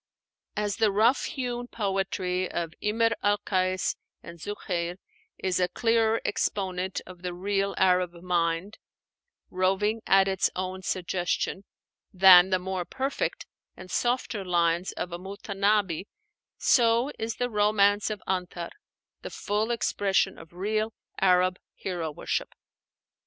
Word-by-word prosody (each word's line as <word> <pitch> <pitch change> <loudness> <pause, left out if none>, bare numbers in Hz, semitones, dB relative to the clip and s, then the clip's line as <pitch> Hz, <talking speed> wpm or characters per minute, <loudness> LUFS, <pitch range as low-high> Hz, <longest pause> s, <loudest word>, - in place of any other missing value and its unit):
As 205 -1 -1
the 220 -2 +3
rough 225 +6 +3
hewn 245 -2 -3
poetry 190 -4 -1
of 165 -2 -3
Imr 225 +2 +2
al 205 0 +3
Kais 185 -2 0 0.3
and 170 0 -10
Zuhéir 180 -2 -3 0.4
is 185 -1 -1
a 180 - +3
clearer 225 +1 +2
exponent 190 -2 -1
of 180 -1 -12
the 180 -1 -4
real 195 +2 -1
Arab 180 -2 +3
mind, 170 +2 -1 0.7
roving 195 +4 +1
at 195 0 +5
its 190 -1 +1
own 185 0 -3
suggestion, 185 +1 -2 0.5
than 185 -1 +8
the 185 - +3
more 185 0 -3
perfect 265 +9 -3 0.3
and 185 - -11
softer 240 -4 0
lines 175 0 +1
of 180 - -4
a 175 - -5
Mutanábbi, 200 -1 0 0.5
so 235 +2 +3
is 225 0 -2
the 245 0 -2
'Romance 205 -1 +3
of 210 -2 -5
Antar' 180 -2 -3 0.5
the - - -6
full 210 +2 -1
expression 200 -4 +1
of 165 -1 -13
real 215 +5 -1 0.3
Arab 185 -1 +3 0.2
hero 175 -4 -3
worship. 150 - -3
190 Hz, 125 wpm, -27 LUFS, 180-210 Hz, 0.7 s, than